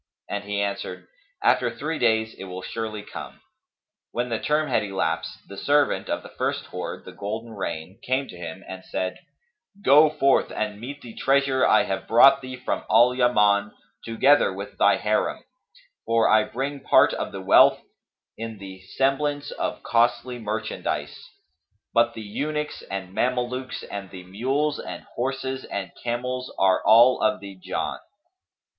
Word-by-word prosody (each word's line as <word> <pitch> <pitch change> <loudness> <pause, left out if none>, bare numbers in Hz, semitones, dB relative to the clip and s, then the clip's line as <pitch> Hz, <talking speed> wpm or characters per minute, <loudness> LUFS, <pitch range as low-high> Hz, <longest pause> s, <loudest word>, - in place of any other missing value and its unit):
And 100 0 -4
he 100 0 -2
answered, 100 0 -4 0.4
"After - - +3
three 160 0 -4
days 110 -1 +2
it - - -9
will 95 0 -7
surely 110 -1 -5
come." - - -9 0.7
When 120 +1 -2
the 115 -1 -1
term 150 +1 +1
had - - +2
elapsed, 90 -5 -3
the 100 - -10
servant 145 0 +2
of - - -2
the - - -12
first - - -1
hoard, - - -6
the - - -9
golden 110 +3 -5
rain, 95 -3 -5
came 130 +2 -1
to - - -10
him 85 +2 -8
and 95 0 -8
said, 95 0 -3 0.6
"Go 150 +3 +7
forth 140 -2 +2
and 105 -1 -3
meet 140 +4 -7
the 115 -2 -10
treasure 135 0 +2
I 110 - +5
have 95 0 -4
brought 135 +4 +7
thee 130 -1 -7
from 125 - -3
Al 120 +2 +6
Yaman 105 -5 +3 0.3
together 130 +3 +4
with 100 +2 -7
thy - - +5
Harim; - - 0 0.6
for 115 0 +3
I 110 0 +4
bring 140 +3 -4
part - - +4
of - - -3
the 95 - -6
wealth 95 - +6 0.6
in 115 -1 -5
the 95 -1 -10
semblance 135 +7 -1
of - - -4
costly 120 +1 +1
merchandise; 110 0 -4 0.6
but 115 0 +3
the 110 - -6
eunuchs 150 +8 -3
and 95 -1 -5
Mamelukes 125 +3 -2
and 100 -2 -7
the 90 -1 -10
mules 135 +10 -1
and - - -7
horses 130 +1 -3
and 95 -3 -5
camels 125 +2 -3
are 95 -1 +3
all 120 +4 +6
of 130 - +2
the 100 -1 -9
Jann." 95 0 -3
115 Hz, 160 wpm, -24 LUFS, 100-130 Hz, 0.7 s, Go